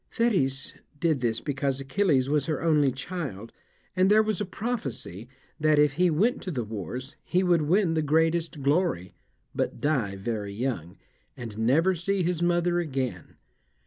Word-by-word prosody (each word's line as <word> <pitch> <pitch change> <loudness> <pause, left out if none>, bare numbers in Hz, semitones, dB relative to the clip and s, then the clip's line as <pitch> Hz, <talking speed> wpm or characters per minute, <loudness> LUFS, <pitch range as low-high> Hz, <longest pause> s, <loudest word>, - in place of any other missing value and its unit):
Thetis 140 - +1 0.3
did 160 -3 +2
this 115 -2 -1
because 140 -1 -1
Achilles 135 -1 +1
was 145 -1 +1
her 155 - -1
only 150 -4 +3
child, 130 - -6 0.4
and 185 +1 +4
there 215 +1 +6
was 215 -1 -1
a - - 0
prophecy 165 - -4 0.3
that, 155 0 +3
if 150 -1 +4
he 180 +4 +3
went 200 +10 +1
to 190 - -5
the 130 -9 -2
wars, 115 - -6
he 180 +2 +1
would 175 -3 +3
win 170 +3 +2
the 160 - +1
greatest 160 0 +1
glory, 140 - +1 0.4
but - - -2
die 130 -10 0
very 100 0 -4
young, 110 -8 -3 0.4
and 115 -4 -7
never 150 +11 +3
see 185 +2 -1
his 175 -1 -1
mother 175 0 +2
again. 130 - -3
150 Hz, 160 wpm, -27 LUFS, 125-175 Hz, 0.4 s, there